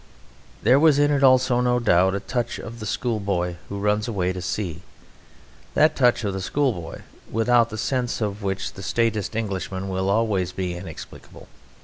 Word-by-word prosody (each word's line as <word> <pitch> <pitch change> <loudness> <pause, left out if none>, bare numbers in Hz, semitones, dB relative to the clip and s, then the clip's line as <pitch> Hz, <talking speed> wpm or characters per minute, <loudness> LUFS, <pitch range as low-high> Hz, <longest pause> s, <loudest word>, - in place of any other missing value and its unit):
There 125 +5 +5
was 155 -2 +5
in 145 0 +3
it 140 -1 +1
also, 130 -1 +4
no 125 0 +2
doubt, 95 -5 +3
a - - -1
touch 120 +4 -3
of 115 0 -8
the 110 - -5
schoolboy 100 -7 -1
who 100 - -4
runs 105 +1 0
away 95 -5 -1
to 90 - -6
sea 90 -2 -3 0.9
that 155 - +4
touch 120 -3 +3
of 100 -2 -1
the 95 - -4
schoolboy 105 - -2 0.3
without 115 +1 +3
the 110 - -6
sense 125 +2 -1
of 105 -2 -3
which 95 -1 -3
the - - -10
staidest 110 0 -1
Englishman 95 -3 -3
will 95 0 -1
always 100 -4 +1
be 90 -2 -3
inexplicable. 85 -2 -10
105 Hz, 170 wpm, -23 LUFS, 95-120 Hz, 0.9 s, There